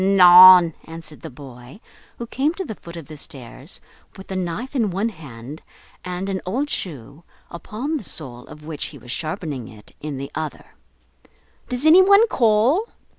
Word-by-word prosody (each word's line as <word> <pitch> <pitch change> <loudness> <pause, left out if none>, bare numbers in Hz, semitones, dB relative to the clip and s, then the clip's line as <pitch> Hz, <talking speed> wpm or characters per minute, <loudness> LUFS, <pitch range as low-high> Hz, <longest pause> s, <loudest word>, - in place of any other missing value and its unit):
"Anan!" 180 -2 +8
answered 165 -2 -10
the - - -8
boy, 130 - -13 0.4
who 235 - -6
came 280 +7 -1
to 380 - -5
the 220 - -6
foot 170 -4 -12
of 165 - -9
the 155 - -10
stairs, 135 - -8 0.4
with 190 0 -12
a - - -3
knife 185 - -4
in 225 -6 +1
one 195 +5 -1
hand 145 - -11 0.4
and 180 +1 -5
an 190 -1 -3
old 265 +11 -2
shoe, 145 - -6 0.3
upon 240 - -4
the 275 - -8
sole 125 -9 -7
of 150 0 -13
which 155 -2 -5
he - - -9
was 120 - -10
sharpening 155 - -5
it, 105 -1 -16
in 150 -2 -5
the 140 +1 -7
other, 155 0 -6 1.0
"Does 250 +3 -2
any 330 +4 +8
one 400 +4 +6
call?" 240 - +2
175 Hz, 175 wpm, -21 LUFS, 145-220 Hz, 1.0 s, Anan